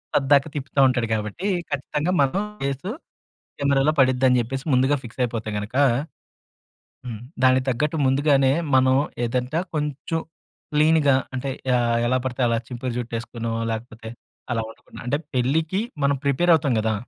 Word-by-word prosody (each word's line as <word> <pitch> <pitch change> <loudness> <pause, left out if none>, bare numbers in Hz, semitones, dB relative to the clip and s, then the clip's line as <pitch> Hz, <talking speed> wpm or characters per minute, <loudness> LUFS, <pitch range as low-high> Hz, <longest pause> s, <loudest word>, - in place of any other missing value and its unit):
పద్దాక 140 0 +4
తిప్పుతా 140 0 -3
ఉంటాడు 120 -3 0
కాబట్టి, 105 - -4 0.2
ఖచ్చితంగా 150 +4 -1
మన 135 -1 +3 0.3
ఫేసు 140 +8 -2 0.7
కెమెరాలో 140 +1 +2
పడిద్దని 130 -1 +4
చెప్పేసి, 135 +4 -5
ముందుగా 130 +3 +3
ఫిక్సయిపోతే 115 -2 -3
గనక 105 +3 -7 1.3
హ్మ్. 115 -4 -6 0.2
దానికి 130 0 +5
తగ్గట్టు 150 +6 0
ముందుగానే 135 0 +3 0.2
మనం 130 0 +4 0.3
ఏదంట 125 +4 -2 0.2
కొంచుం 150 +2 -2 0.5
క్లీన్‌గా 150 -2 +4 0.2
అంటే 130 +2 -3 0.2
యాహ్! 120 -1 +2
ఎలా 130 +1 +2
పడితే 130 0 -3
అలా 115 0 +1
చింపురు 125 0 -4
జుట్టేసుకోనో 115 -1 -4 0.2
లేకపోతే 110 0 -6 0.5
అలా 115 - 0
ఉండకుండ, 115 - -15
అంటే 145 +4 +1 0.2
పెళ్ళికి 155 - +1 0.2
మనం 140 0 +3
ప్రిపేరఅవుతాం 145 -1 +3
గదా! 110 0 0
130 Hz, 125 wpm, -23 LUFS, 120-145 Hz, 1.3 s, దానికి